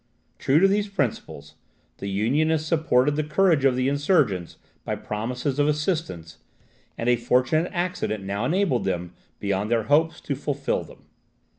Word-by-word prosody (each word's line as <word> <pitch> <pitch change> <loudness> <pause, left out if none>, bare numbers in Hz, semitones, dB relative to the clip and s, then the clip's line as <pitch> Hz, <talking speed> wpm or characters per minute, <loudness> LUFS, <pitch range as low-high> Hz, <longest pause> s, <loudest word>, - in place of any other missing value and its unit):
True 135 - +2
to 190 +4 +6
these 205 +1 +1
principles, 115 - -3 0.5
the 100 - -4
Unionists 150 +10 +1
supported 150 -4 +2
the 155 - 0
courage 155 -1 +2
of 130 -2 +4
the 130 +1 0
insurgents 140 - +1 0.3
by - - -2
promises 125 +6 -3
of 145 - +3
assistance; 150 - -2 0.6
and 115 - -3
a 125 - +5
fortunate 125 +7 +1
accident 175 - -2
now 100 +3 -3
enabled 170 -5 +1
them, 90 -2 -3 0.3
beyond 100 +1 -1
their 115 -1 +1
hopes, 155 +6 +2
to 145 - -3
fulfil 140 0 -2
them. - - -16
135 Hz, 150 wpm, -24 LUFS, 110-155 Hz, 0.6 s, to